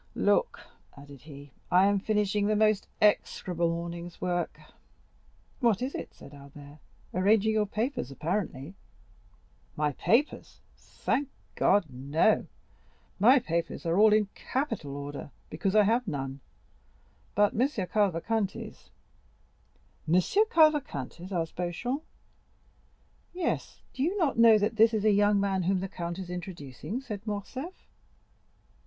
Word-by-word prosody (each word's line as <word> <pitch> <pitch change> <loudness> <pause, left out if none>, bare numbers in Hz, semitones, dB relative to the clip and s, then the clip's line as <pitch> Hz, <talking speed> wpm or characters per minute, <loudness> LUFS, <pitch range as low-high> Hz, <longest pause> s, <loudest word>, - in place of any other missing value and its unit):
Look," - - +1 0.4
added 140 -2 -13
he. 145 -2 -12 0.2
"I 185 +2 +5
am 200 0 +3
finishing 210 0 0
the 215 - +2
most 215 -1 +2 0.2
execrable 180 -4 +1
morning's 170 +1 -5
work." 175 -1 -2 1.0
"What 235 -7 +2
is 265 - -3
it?" - - -6
said 140 - -14
Albert; 145 +1 -13 0.3
"arranging 205 +3 +3
your 215 -1 +1
papers, 225 - -2
apparently." 155 0 -3 1.0
"My 150 0 0
papers, 240 - 0 0.2
thank 280 0 -3 0.2
God, 205 -3 +3
no,—my 160 - 0
papers 170 -2 -3
are 170 +3 +1
all 215 0 +7
in 210 0 +4
capital 225 - -3
order, 145 0 -7 0.2
because 190 +6 -1
I 210 - +7
have 230 +3 +1
none; 135 -4 -4 1.0
but 205 0 +3
M. 250 +5 +2
Cavalcanti's." 205 - -2 1.2
"M. - - +5 0.3
Cavalcanti's?" 270 - +1
asked 165 -3 -2
Beauchamp. 180 - -3 1.3
"Yes; 355 -2 -3
do - - -5
you 350 +8 0
not 310 - 0
know 230 -2 +8
that 215 +2 -1
this 225 +1 +5
is 215 -1 -1
a 215 - +5
young 205 0 +3
man 195 -1 0
whom 185 +2 +1
the 190 - -3
count 170 -1 -5
is 185 -2 -7
introducing?" 180 - -6
said 215 -7 -6
Morcerf. 255 - -6
195 Hz, 125 wpm, -28 LUFS, 165-220 Hz, 1.3 s, know